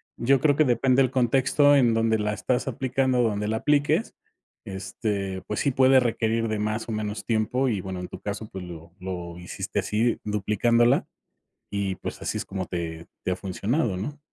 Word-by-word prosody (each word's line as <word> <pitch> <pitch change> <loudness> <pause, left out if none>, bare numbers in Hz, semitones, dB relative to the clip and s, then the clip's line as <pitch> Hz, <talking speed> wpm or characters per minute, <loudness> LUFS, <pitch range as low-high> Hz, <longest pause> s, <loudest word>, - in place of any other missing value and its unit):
yo 135 +2 +3
creo 145 0 +3
que 155 - +4
depende, 130 0 +3
el 130 -2 +2
contexto 135 +3 +4
en 120 -5 +4
donde 115 0 +2
la 105 0 -1
estás 115 +4 -1
aplicando, 130 -1 +1
donde 105 -2 0
la 110 - 0
apliques, 150 - +1 0.5
este, 95 0 -3
pues 105 - -2
sí, 140 - +2
puede 130 +1 +5
requerir 115 -2 0
de 110 -1 -2
más 110 +1 -2
o - - -4
menos 105 0 -3
tiempo, 115 +4 +1
y 105 -6 0
bueno, 95 0 -5
en 90 - -5
tu - - -9
caso, 105 +1 -4
pues, 95 - -7
lo 85 -1 -10
lo 90 -2 -6
hiciste, 95 +3 -4
así 110 +4 0
duplicándola, 110 +3 +2 0.6
y 100 -2 -1
pues, - - -7
así - - -2
es - - -4
como 95 -1 -4
te 85 -2 -5 0.2
te - - -1
ha - - +1
funcionado, 100 - -1
¿no? 145 +10 -5
110 Hz, 190 wpm, -25 LUFS, 95-125 Hz, 0.6 s, puede